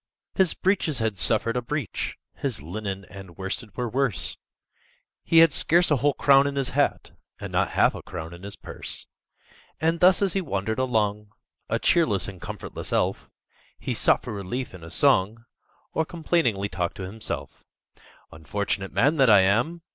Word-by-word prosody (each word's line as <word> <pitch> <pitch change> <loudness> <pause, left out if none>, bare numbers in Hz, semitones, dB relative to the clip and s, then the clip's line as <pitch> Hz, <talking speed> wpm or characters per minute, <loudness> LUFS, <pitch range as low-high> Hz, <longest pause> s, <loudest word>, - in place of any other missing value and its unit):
His 190 -4 +2
breeches 185 -7 0
had 110 -4 -1
suffered 115 +1 +2
a 125 - 0
breach, 135 -1 -4 0.2
His - - -3
linen 95 +5 -5
and 95 -4 -11
worsted 95 +3 -6
were 125 -1 -1
worse; 125 -6 0 0.9
He 165 - +2
had 155 - -3
scarce 175 +3 +5
a 150 - +4
whole 145 +2 +1
crown 140 0 +5
in 140 - -3
his 135 -2 -1
hat, - - 0 0.3
And - - -7
not - - +1
half - - +4
a - - -8
crown 85 -2 -8
in 85 - -12
his 100 +1 -7
purse. - - -7 0.7
And 165 +1 +1
thus 185 +3 +5
as 190 -4 +1
he 195 - 0
wandered 110 - -3
along, 105 -4 -1 0.4
A - - +1
cheerless 105 - +2
and 95 -3 -9
comfortless - - -6
elf, - - -1 0.5
He - - -3
sought - - +3
for - - -6
relief 105 +6 -5
in 90 -3 -11
a 80 - -9
song, 100 +8 +2 0.5
Or 160 - +1
complainingly 155 - 0
talked 90 -4 -3
to 95 - -6
himself:— 105 +4 -5 0.7
"Unfortunate 95 +4 -3
man 150 +3 +2
that 135 -4 +5
I 105 -3 +7
am! 120 - +1
110 Hz, 170 wpm, -25 LUFS, 95-145 Hz, 0.9 s, I